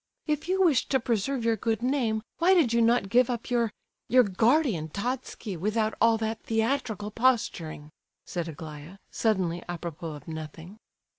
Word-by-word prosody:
"If 300 0 -1
you 380 +1 +3
wished 305 -9 +3
to 265 - +3
preserve 235 +1 -1
your 230 -1 +3
good 225 +2 -1
name, 240 -5 0 0.2
why 370 +3 +5
did 285 -10 +3
you 235 - +3
not 230 -3 +3
give 245 +5 +4
up 240 0 -4
your—your 240 +1 +1
'guardian,' 220 - +2
Totski, 230 - -4
without 215 +5 0
all 230 0 +5
that 220 0 -3
theatrical 225 -2 -1
posturing?" 200 -11 0 0.3
said 175 -2 -4
Aglaya, 155 +2 -9
suddenly 185 -6 0
a 175 - -3
propos 165 -1 -6
of 145 - -13
nothing. 160 +5 -8
225 Hz, 155 wpm, -27 LUFS, 175-245 Hz, 0.3 s, why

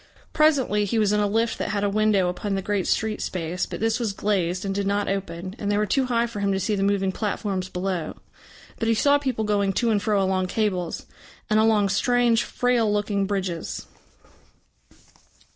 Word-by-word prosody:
Presently 270 -9 +3
he 215 +3 -1
was 210 -2 +3
in 210 - +2
a 205 - +2
lift 225 +3 0
that - - -2
had 205 -1 -1
a - - +2
window 205 -2 +2
upon 195 +3 -2
the 195 - -2
great 205 -2 -1
street 220 -1 0
space, 175 0 -3
but - - -6
this 225 +2 0
was 225 -4 -1
glazed 190 -2 -1
and 195 - -1
did 200 0 -1
not 205 +1 0
open, 185 -1 -4
and 205 - -2
they 205 - +1
were 210 - +2
too 265 +6 +1
high 235 -1 +1
for 235 -3 -6
him 200 -1 +1
to 190 - 0
see 210 - -1
the 200 - -1
moving 195 -1 +1
platforms 195 -2 -3
below. 180 -2 -3 0.6
But 225 - -1
he 230 - +3
saw 285 +5 +4
people 255 -6 -2
going 200 -2 +1
to 235 +3 +1
and 205 -2 +1
fro 210 -2 +1
along 190 -1 +1
cables 185 -5 -2 0.5
and 215 - +4
along 215 -2 +3
strange, 240 +2 +2
frail 245 -3 +1
looking 205 -1 0
bridges. 190 -4 -3
205 Hz, 200 wpm, -24 LUFS, 195-220 Hz, 0.6 s, saw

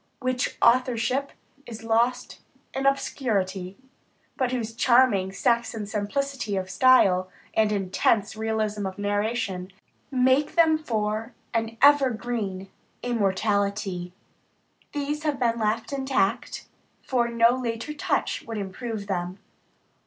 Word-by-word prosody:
whose 255 -1 -1
authorship 250 +2 +2 0.4
is 225 -1 -8
lost 235 +2 0 0.3
in 270 0 0
obscurity, 200 -9 -1 0.6
but 255 -2 0
whose 230 -3 -3
charming 235 -5 +3
Saxon 230 +1 0
simplicity 215 +2 -2
of 190 0 -3
style, 190 -8 +4 0.2
and 215 -1 +2
intense 205 +2 +1
realism 215 -2 -1
of 190 +1 -7
narration, 205 -2 -2 0.4
make 260 +2 +3 0.3
for 220 -1 -2 0.2
them 230 0 +1
an 225 0 -13
ever 285 -2 +7
green 215 -5 -4 0.4
immortality 200 -4 0 0.8
these 295 +1 -3
have 300 -3 -1
been 235 -2 +1
left 220 +5 -1
intact, 265 -7 -1 0.4
for 245 -2 +1
no 235 0 +4
later 240 +2 -3
touch 300 - -1
would 225 -1 -4
improve 205 +2 -5
them. 180 -1 -3
225 Hz, 110 wpm, -25 LUFS, 200-255 Hz, 0.8 s, ever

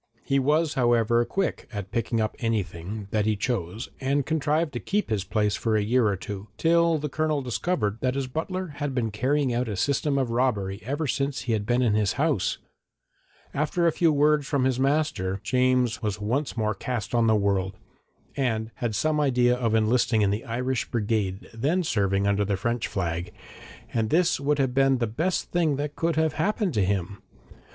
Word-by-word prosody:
He 135 0 +1
was, 150 +4 +2
however, 120 -2 +3
quick 195 +4 -2
at 100 -3 -6
picking 115 0 -1
up 110 -1 -1
anything 105 -3 -3
that 105 -1 +1
he 110 - +2
chose 105 -2 -3
and 140 +1 0
contrived 155 0 0
to 120 - -3
keep 205 - -1
this 105 -4 0
place 105 +1 0
for 110 -2 0
a 105 - +1
year 120 +2 +3
or 100 - +1
two, 100 +2 -7
till 170 0 +3
the 150 0 -3
Colonel 155 0 -1
discovered 120 - -1
that 130 0 0
his 140 -1 -1
butler 170 +7 -3
had 145 -2 -3
been 115 -4 0
carrying 130 +4 +1
out 120 +1 0
a 105 - -2
system 140 +8 0
of 130 -4 0
robbery 105 -6 0
ever 145 +5 -2
since 140 +1 -1
he 120 - -1
had 105 -1 -2
been 125 +1 +2
in 115 -4 +2
his 105 -2 +2
house. - - 0 1.0
After 155 +4 0
a 165 - +5
few 165 0 +3
words 150 -1 +3
from 140 -3 +1
his 130 -1 +1
master, 135 -9 0
James 125 -2 +2
was 105 -2 -2
once 125 +7 -2
more 110 -1 +1
cast 115 +3 -4
on 115 -1 +3
the 110 - +4
world, 100 -2 0 0.6
and 115 -4 -1
had 115 -3 -2
some 155 +7 +1
idea 125 -4 +3
of 115 -3 0
enlisting 110 0 +2
in 100 - +2
the 105 +6 -3
Irish 125 +1 -2
brigade 105 -4 -1
then 150 +11 0
serving 100 - +1
under 100 0 +2
the 100 -1 -1
French 115 +4 -1
flag, 85 -2 -3 0.6
and 110 -2 0
this 175 -1 +2
would 145 +1 +1
have 135 -3 +1
been 135 0 +3
the 120 - 0
best 160 +12 -2
thing 165 -5 +2
that 145 +1 -4
could 165 -1 0
have 160 -1 +1
happened 195 +2 0
to 105 - +2
him. 100 0 -2
120 Hz, 195 wpm, -26 LUFS, 105-145 Hz, 1.0 s, a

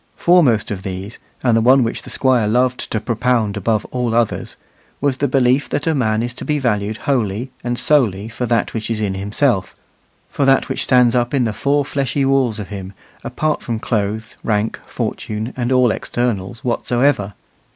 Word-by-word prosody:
Foremost 140 -12 +3
of 100 -2 -4
these, 95 +3 -6 0.2
and 120 -3 +3
the 115 - +3
one 130 +3 +5
which 115 - -2
the - - -11
Squire 125 -5 +2
loved 125 +3 0
to 110 - 0
propound 115 -1 0
above 105 +2 0
all 125 -2 -1
others, 120 -2 0 0.4
was 140 -2 0
the 145 - +1
belief 130 +1 +2
that - - -2
a 165 - +2
man 110 -5 +1
is 120 0 -3
to - - -8
be 150 - 0
valued 110 -5 -1
wholly 120 -2 -1
and 120 0 -2
solely 110 -10 +2
for 120 +2 -4
that 115 -3 0
which 110 -1 -3
he 115 - -1
is - - -6
in 100 -3 -1
himself, 100 +2 0 0.5
for - - -2
that 135 0 +3
which - - -1
stands 125 -2 +4
up 120 +2 +1
in 130 - +2
the 110 -2 -1
four 140 +4 +1
fleshly 140 -1 -1
walls 135 -5 +2
of 105 -3 -6
him, 100 -2 -7 0.3
apart 155 -1 -1
from 115 -2 -3
clothes, 110 -1 -2
rank, 105 0 0
fortune, 110 +3 -4
and 125 0 -2
all 125 -2 +4
externals 115 -3 -3
whatsoever. 120 -4 0
120 Hz, 190 wpm, -19 LUFS, 105-130 Hz, 0.5 s, one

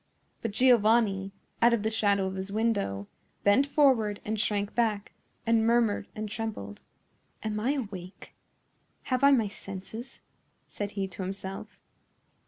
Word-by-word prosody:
But 230 - -2
Giovanni, 215 -4 +3 0.3
out 235 +1 +6
of 210 - -4
the 220 - 0
shadow 200 -3 +2
of 190 - -3
his 190 +1 -5
window, 200 - 0 0.4
bent 230 +8 +4
forward 250 -9 +3
and 220 0 -2
shrank 205 -1 0
back, 215 -4 0 0.3
and 230 -1 +3
murmured 230 -3 +2
and 215 0 -4
trembled. 210 - -5 0.6
"Am 215 -1 -2
I 250 +6 +1
awake? 195 -8 -7 0.8
Have 255 - +1
I 280 - +8
my 240 -6 +4
senses?" 200 +5 -8 0.5
said 205 0 -5
he 195 -1 -2
to 185 - -8
himself. 190 +1 -6
210 Hz, 140 wpm, -28 LUFS, 195-230 Hz, 0.8 s, I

